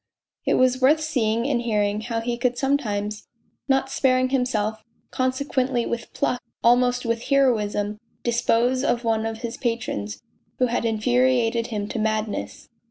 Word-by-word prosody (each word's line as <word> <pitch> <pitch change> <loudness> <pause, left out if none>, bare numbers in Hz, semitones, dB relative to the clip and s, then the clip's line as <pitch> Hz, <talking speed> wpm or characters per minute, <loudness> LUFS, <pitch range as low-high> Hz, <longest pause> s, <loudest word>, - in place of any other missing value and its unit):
It - - +3
was 255 0 +3
worth 290 +5 +5
seeing 240 -6 0
and 260 -4 +1
hearing 210 -2 0
how 230 0 -3
he 240 +1 -2
could 245 0 0
sometimes, 215 -7 -1 0.4
not 270 -1 +1
sparing 255 -1 +2
himself, 220 -5 -1 0.3
consequently 260 -1 0
with 235 -1 -4
pluck, 250 - -1 0.2
almost 245 +1 +3
with 230 0 -1
heroism, 210 -6 +1 0.2
dispose 240 +2 +2
of 240 -3 +1
one 225 -1 +1
of 225 +1 -6
his 235 -1 -4
patrons 220 - -3 0.4
who 255 - +3
had 240 -1 -1
infuriated 235 +1 +2
him 210 -3 -3
to 245 - -3
madness. 215 - -2
235 Hz, 145 wpm, -24 LUFS, 220-255 Hz, 0.4 s, worth